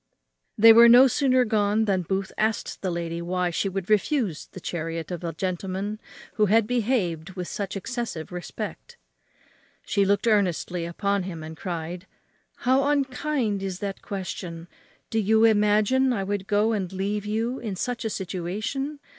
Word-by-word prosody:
They 225 +1 +9
were 235 +1 +8
no 245 +3 +9
sooner 255 -1 +3
gone 215 0 +2
than 195 -3 +1
Booth 190 +2 -2
asked 220 0 -1
the 190 - -1
lady 170 -1 -3
why 180 0 -1
she 195 +4 -1
would 190 -1 -4
refuse 215 - +1
the - - -11
chariot 165 -1 -4
of 175 -1 -5
a 170 - -2
gentleman 190 +4 -3 0.4
who 210 -1 +4
had 220 +2 +4
behaved 205 -8 -1
with 180 -2 -4
such 200 -1 -4
excessive 225 -6 -5
respect? 140 - -7 0.9
She 200 0 +1
looked 200 +2 +1
earnestly 180 -5 +1
upon 200 +4 -1
him, 175 -4 -6
and 160 +1 -8
cried, 175 +1 -5 0.6
"How 260 +2 +4
unkind 270 -6 0
is 190 -2 -3
that 195 0 -5
question! 175 -3 -6 0.4
do 225 - +1
you 220 +1 +3
imagine 215 +4 +4
I 200 -4 -1
would 200 0 -3
go 210 +2 +2
and 195 -5 -2
leave 200 +2 -2
you 230 +4 -1
in 215 -5 -4
such 245 +5 -3
a 220 - -1
situation? 205 - -3
200 Hz, 160 wpm, -25 LUFS, 180-225 Hz, 0.9 s, They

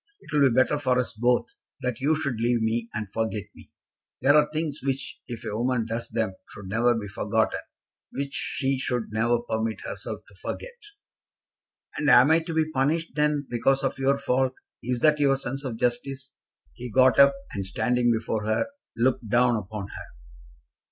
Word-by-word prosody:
It - - -13
will 140 -2 +5
be 115 - -1
better 130 +3 +3
for 130 -3 +1
us 125 -2 -1
both 120 +2 +2 0.4
that 125 -2 -2
you 150 +4 +3
should 140 -7 -2
leave 120 0 +2
me, 115 +1 -1
and 110 -1 -4
forget 110 0 -2
me. - - -16 0.5
There 145 +2 +6
are 150 0 +5
things 155 -1 -2
which, 135 0 -3
if 120 -3 -7
a 105 - -3
woman 120 0 0
does 115 +1 -4
them, 110 -4 -1 0.2
should 100 - -10
never 120 +3 +3
be 110 -2 -4
forgotten; 95 - 0 0.5
which 140 0 -4
she 135 -1 -1
should 125 -4 -2
never 115 +2 +2
permit 110 -1 -2
herself - - -6
to - - -18
forget." - - -5 1.3
"And 150 - +2
am 130 +5 +7
I 160 - +6
to 165 0 -6
be 155 -1 +1
punished, 155 +4 0
then, 150 -1 +1
because 135 +3 +1
of 135 0 -1
your 135 +1 +2
fault? 130 -1 0 0.3
Is 125 0 -2
that 150 -1 +4
your 135 -2 +3
sense 135 +1 -4
of 125 -5 -4
justice?" 130 +3 -2 0.4
He 125 - -7
got 130 +1 +4
up, 140 0 +7 0.2
and 100 - -3
standing 120 +5 +1
before 110 -1 -1
her, 110 - +1 0.3
looked 120 -2 +1
down 120 +2 +4
upon 105 -1 -5
her. - - -8
125 Hz, 185 wpm, -26 LUFS, 115-140 Hz, 1.3 s, am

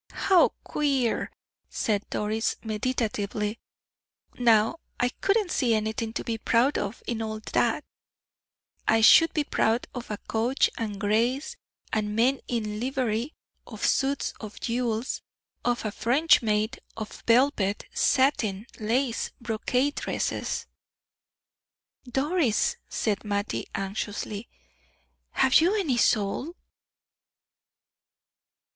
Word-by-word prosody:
"How 365 -3 +7
queer!" 275 -6 0 0.4
said 210 -2 -1
Doris, 215 +2 -1
meditatively. 215 -2 -2 0.7
"Now, 230 +5 +3 0.2
I 245 - +2
couldn't 395 - 0
see 235 -4 +2
anything 220 +1 -2
to - - -3
be 225 -1 -3
proud 240 +6 +2
of 205 +3 -5
in 230 -2 -2
all 220 -1 -3
that. - - +2 1.0
I 225 0 +4
should 325 +9 +7
be 305 - 0
proud 230 -4 +1
of 245 -2 -7
a 210 - -3
coach 230 +5 +1
and 210 -3 -4
grays, 240 - 0 0.4
and 210 -1 0
men 255 +4 +3
in 215 -3 -2
livery 250 +1 -1 0.3
of - - -4
suits 275 +1 +1
of 215 -2 -8
jewels, 235 0 -1 0.4
of 245 -2 0
a 215 - -1
French 275 +10 +3
maid, 215 +2 0 0.2
of 215 -1 -7
velvet, 230 -5 +3
satin, 230 -7 +2
lace, 230 +3 0
brocade 245 +4 0
dresses." - - -2 1.4
"Doris," 270 - +1
said 210 -3 -1
Mattie, 205 -1 -2
anxiously, 200 +2 -4 0.8
"have 265 +2 +4
you 360 +6 +3
any 285 -11 0
soul?" 235 - +1
230 Hz, 110 wpm, -27 LUFS, 215-265 Hz, 1.4 s, How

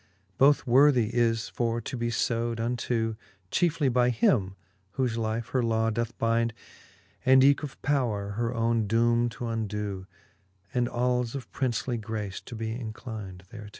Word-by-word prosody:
Both 140 +1 +5
worthie 125 -3 +5
is 115 -1 +1
for 115 -1 -1
to 115 - -6
be 120 -1 -1 0.2
lewd 115 -1 -2
unto, 115 -1 -1 0.3
Chiefely 165 -4 +2
by 125 -1 +3
him, 105 -5 +2 0.4
whole 130 -1 +1
life 115 0 -2
her 130 - +1
law 115 -1 +1
doth 115 +1 -3
bynd. 115 0 +1 0.7
And 130 0 +6
eke 140 +1 +5
of 145 -3 -7
powre 115 -8 0
her 115 +2 -1
owne 115 -2 +1
doome 115 +2 +2
to 120 - -6
undo, 105 -4 -3 0.7
And 120 -1 +1
als 125 0 0
of 130 -4 -7
princely 120 -2 -1
grace 105 -3 -5
to 120 - -9
be 110 0 -3
inclyn'd 110 -5 -7
thereto. 105 -2 -9
115 Hz, 150 wpm, -27 LUFS, 110-125 Hz, 0.7 s, And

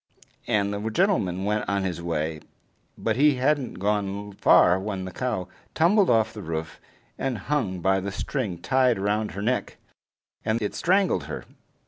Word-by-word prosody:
And 105 -3 +1
the 105 +2 -3
gentleman 110 - +1
went 105 +1 -1
on 100 -1 0
his 90 -3 -3
way, 80 -2 -2 0.6
but 110 0 -1
he 145 +1 +5
hadn't 135 +1 0
gone 100 0 -2
far 95 -1 +5
when 95 -1 -4
the 95 - -6
cow 110 -4 -2 0.3
tumbled 190 +5 +4
off 110 -2 +3
the 105 - -7
roof, 80 -2 -5 0.4
and 135 -3 -1
hung 105 -6 -2
by 95 +2 +3
the 100 +1 -4
string 105 -3 -3
tied 125 +7 +2
round 105 +2 -1
her 100 - -5
neck, 125 +3 -1 0.7
and 110 +1 0
it 105 -2 -2
strangled 190 +2 +2
her. - - -6
105 Hz, 160 wpm, -25 LUFS, 95-125 Hz, 0.7 s, he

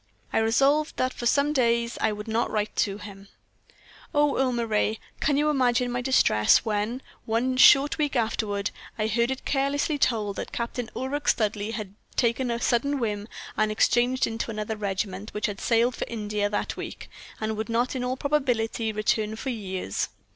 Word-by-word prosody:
I - - +3
resolved 275 +7 +2
that 255 0 0
for 240 - -2
some 285 +4 +3
days 235 -3 +1
I 220 - +2
would 210 +1 -6
not 225 +1 0
write 210 -1 -2
to 200 0 +1
him. 200 -1 -11 0.9
"Oh, 290 -1 +3
Earle 260 -1 +2
Moray! 220 -2 0 0.2
can 285 -1 +2
you 300 +1 +3
imagine 250 -3 +2
my 245 0 -1
distress 240 - +4
when, 220 +4 -1 0.2
one 240 +3 0
short 280 +3 +6
week 295 -2 0
afterward, 215 -3 -1 0.3
I 215 - 0
heard 235 +2 +1
it 265 0 -4
carelessly 285 +2 0
told 215 -6 +1
that - - -5
Captain 235 0 -4
Ulric 270 +4 -3
Studleigh 215 0 +1
had 210 -3 -5 0.2
taken 240 +1 +1
a 235 0 -1
sudden 265 +5 +1
whim, 210 -4 -2 0.3
and 215 0 +2
had 215 - -4
exchanged 245 +3 +3
into 225 +1 -4
another 215 0 -3
regiment, 200 0 -4
which 210 - -1
had 200 -1 -4
sailed 235 +1 +2
for - - -4
India 210 -2 -2
that 205 - -2
week, - - -7 0.3
and 220 0 -2
would 220 +2 -4
not 240 +3 0
in 255 - -2
all 255 +1 -1
probability 245 -6 0
return 215 0 0
for 260 +4 -4
years. 190 - -3
230 Hz, 180 wpm, -26 LUFS, 215-255 Hz, 0.9 s, short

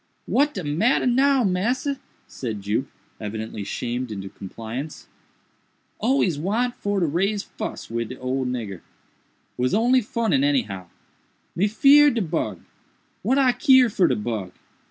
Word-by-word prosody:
"What 290 +2 +2
de 185 - -3
matter 165 - +2
now, 265 +1 +3
massa?" 240 +9 0 0.3
said 110 -6 -6
Jup, 105 +6 0 0.3
evidently 110 0 -5
shamed 120 +4 -3
into 95 -2 -6
compliance; 115 +10 -7 0.9
"always 215 - +1
want 225 +9 0
for 205 -3 -2
to 175 - +2
raise 195 +7 0
fuss - - -6
wid 115 +2 -4
old 130 0 -1
nigger. 110 -8 -4 0.8
Was 125 +7 +1
only 245 +4 +4
funnin 215 - 0
any 140 -2 +3
how. 95 -4 -8 0.7
Me 195 +4 +2
feered 280 +5 +6
de 230 - +1
bug! 160 -1 -2 0.6
what 265 - +1
I 265 -2 +5
keer 260 -4 +5
for 185 -3 +3
de 125 - +1
bug?" 105 -4 -4
170 Hz, 140 wpm, -23 LUFS, -, 0.9 s, feered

